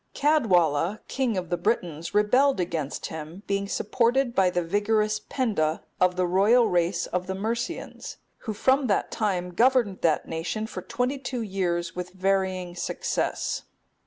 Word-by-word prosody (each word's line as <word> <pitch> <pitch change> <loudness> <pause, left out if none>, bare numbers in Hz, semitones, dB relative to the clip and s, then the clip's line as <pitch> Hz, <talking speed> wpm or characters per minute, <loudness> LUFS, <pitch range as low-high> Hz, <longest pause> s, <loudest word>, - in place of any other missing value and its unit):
Caedwalla,(270) 190 - +2
king 255 -6 -1
of 180 -2 -4
the 175 - +1
Britons, 170 -5 -2
rebelled 250 +5 +4
against 165 -5 -2
him, 160 +4 -7
being 200 0 -1
supported 240 +5 +1
by 190 -5 +4
the 175 -1 -1
vigorous 210 +4 +1
Penda, 185 - -1 0.2
of 180 0 +3
the 180 0 +1
royal 205 +7 +4
race 175 0 +1
of 180 0 -3
the 190 - -2
Mercians, 235 - -4 0.3
who 215 - -1
from 265 +5 +2
that 200 - 0
time 185 -5 -1
governed 235 -2 +3
that 160 -2 +1
nation 170 +7 -3
for 185 - -6
twenty 250 +8 -2
two 255 -3 -3
years 175 -4 -2
with 180 0 -5
varying 190 -1 0
success. 175 - -2
195 Hz, 150 wpm, -26 LUFS, 175-230 Hz, 0.3 s, rebelled